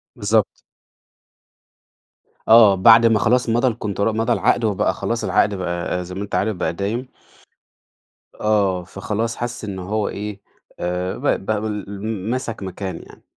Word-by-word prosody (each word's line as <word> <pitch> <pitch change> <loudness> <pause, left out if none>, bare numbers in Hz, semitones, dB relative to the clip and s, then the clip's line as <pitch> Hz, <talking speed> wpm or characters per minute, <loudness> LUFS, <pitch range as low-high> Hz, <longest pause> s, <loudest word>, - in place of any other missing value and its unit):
بالضبط. 105 +1 +2 2.0
آه، 110 -3 +7
بعد 115 +4 +7
ما 115 -2 +4
خلاص 120 +3 +2
مضَى 120 +3 +2
الContra 105 -3 -5
مضَى 110 +2 +1
العَقد، 120 - +1
وبقى 100 -3 +1
خلاص 115 +4 -3
العَقد 105 -1 +2
بقى 90 0 -3
زي 90 +1 -8
ما 100 - -4
أنت 100 - -5
عارف 110 0 0
بقى 90 - -2
دايم. 105 +8 -3 1.3
آه، 100 -4 +1
فخلاص 105 +5 -3
حَسّ 120 -1 -5
إن 95 -2 -5
هو 105 +3 -2
إيه، 105 0 -6 0.4
آآ، 90 +1 -2
ب - - -11 0.2
بابل 105 -1 -2 0.4
مسَك 120 -4 -3
مكان 95 -1 -5
يعني. - - -17
105 Hz, 140 wpm, -21 LUFS, 95-115 Hz, 2.0 s, آه